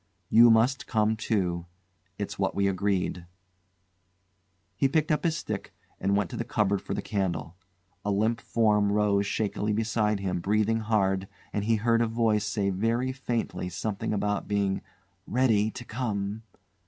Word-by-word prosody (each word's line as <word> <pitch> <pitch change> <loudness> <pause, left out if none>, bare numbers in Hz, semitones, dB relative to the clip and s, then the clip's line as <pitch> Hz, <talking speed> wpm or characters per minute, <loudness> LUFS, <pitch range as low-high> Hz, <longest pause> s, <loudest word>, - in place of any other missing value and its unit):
You 120 +1 +8
must 115 +4 +3
come 110 -1 +2
too. 90 -6 -1 0.5
It's 100 -2 -5
what 95 - 0
we 100 0 +2
agreed." 95 -2 -1 1.5
He 135 - +3
picked 155 +3 +1
up 150 - +1
his 165 -2 +1
stick - - -5 0.2
and 100 +1 +1
went 100 -4 -1
to - - -5
the - - -2
cupboard 105 -4 0
for - - -4
the - - -3
candle. 95 -5 -2 0.5
A 105 - -2
limp 110 +3 +1
form 105 -3 +2
rose 100 -1 +2
shakily 105 0 -1
beside 110 -1 +1
him 95 -2 -2
breathing 105 +4 +1
hard, 100 -3 +1 0.3
and 105 -1 -1
he 115 +1 +3
heard 115 +2 +2
a 115 - +2
voice 110 -2 +1
say 100 -2 0
very 115 +7 0
faintly 120 -7 -3
something 105 +2 -3
about 105 -1 -1
being 100 -2 0 0.5
"ready 110 -4 +2
to 120 +2 -8
come." 110 -3 -3
105 Hz, 155 wpm, -28 LUFS, 100-115 Hz, 1.5 s, You